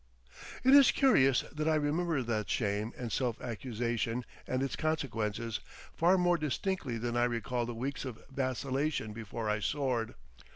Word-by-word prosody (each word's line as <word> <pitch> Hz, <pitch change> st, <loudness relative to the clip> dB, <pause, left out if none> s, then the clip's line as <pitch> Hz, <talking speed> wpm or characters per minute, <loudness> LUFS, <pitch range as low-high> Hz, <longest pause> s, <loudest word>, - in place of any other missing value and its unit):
It 260 Hz, +2 st, +6 dB
is 280 Hz, -2 st, +9 dB
curious 135 Hz, -, +4 dB
that 155 Hz, +1 st, -2 dB
I 160 Hz, -, +4 dB
remember 155 Hz, 0 st, +1 dB
that 110 Hz, -4 st, -2 dB
shame 105 Hz, 0 st, 0 dB
and 120 Hz, -3 st, -4 dB
self 125 Hz, -4 st, -1 dB
accusation 120 Hz, 0 st, -2 dB, 0.2 s
and 130 Hz, +1 st, 0 dB
its 135 Hz, -, -2 dB
consequences 115 Hz, -8 st, -2 dB, 0.3 s
far 175 Hz, +3 st, +4 dB
more 175 Hz, -1 st, +3 dB
distinctly 150 Hz, -, -2 dB
than 120 Hz, +1 st, -2 dB
I 120 Hz, 0 st, +3 dB
recall 120 Hz, 0 st, -1 dB
the 120 Hz, -, -4 dB
weeks 130 Hz, +4 st, -3 dB
of 125 Hz, -5 st, -6 dB
vacillation 135 Hz, -2 st, -1 dB
before 110 Hz, 0 st, -5 dB
I 105 Hz, 0 st, +1 dB
soared. 120 Hz, -1 st, -1 dB
125 Hz, 155 wpm, -32 LUFS, 115-150 Hz, 0.3 s, is